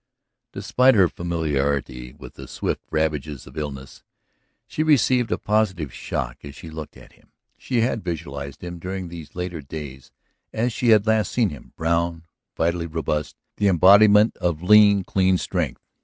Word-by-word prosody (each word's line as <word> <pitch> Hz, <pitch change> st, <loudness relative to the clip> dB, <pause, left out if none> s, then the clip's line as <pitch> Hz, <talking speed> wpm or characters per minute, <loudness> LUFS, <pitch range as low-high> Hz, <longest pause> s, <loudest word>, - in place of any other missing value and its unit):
Despite 115 Hz, +6 st, +3 dB
her 95 Hz, -4 st, +5 dB
familiarity 70 Hz, -7 st, -2 dB
with -, -, -12 dB
the -, -, -11 dB
swift -, -, -3 dB
ravages 75 Hz, -3 st, -2 dB
of -, -, -14 dB
illness 70 Hz, -3 st, -7 dB, 0.6 s
she -, -, -4 dB
received 130 Hz, -6 st, +3 dB
a -, -, +1 dB
positive 95 Hz, -, -1 dB
shock 60 Hz, -1 st, -5 dB
as 70 Hz, 0 st, -10 dB
she 80 Hz, -, -10 dB
looked 80 Hz, -1 st, -8 dB
at -, -, -16 dB
him; -, -, -27 dB, 0.3 s
she 125 Hz, -3 st, -1 dB
had 115 Hz, -2 st, -1 dB
visualized 70 Hz, -5 st, -6 dB
him 85 Hz, -1 st, -7 dB
during 95 Hz, 0 st, -5 dB
these 85 Hz, -3 st, -10 dB
latter 90 Hz, -2 st, -4 dB
days 70 Hz, -2 st, -9 dB, 0.4 s
as 115 Hz, +2 st, -1 dB
she 125 Hz, -, -2 dB
had 110 Hz, -2 st, +5 dB
last 110 Hz, -2 st, +1 dB
seen 115 Hz, -4 st, +1 dB
him, 75 Hz, -5 st, -12 dB
brown, 85 Hz, 0 st, -1 dB, 0.3 s
vitally 85 Hz, 0 st, 0 dB
robust, 75 Hz, -2 st, -3 dB, 0.2 s
the 105 Hz, -, +2 dB
embodiment 100 Hz, +4 st, +6 dB
of 85 Hz, -2 st, -2 dB
lean, 100 Hz, 0 st, +6 dB
clean 95 Hz, 0 st, +2 dB
strength. 85 Hz, -7 st, -3 dB
85 Hz, 155 wpm, -23 LUFS, 75-105 Hz, 0.6 s, embodiment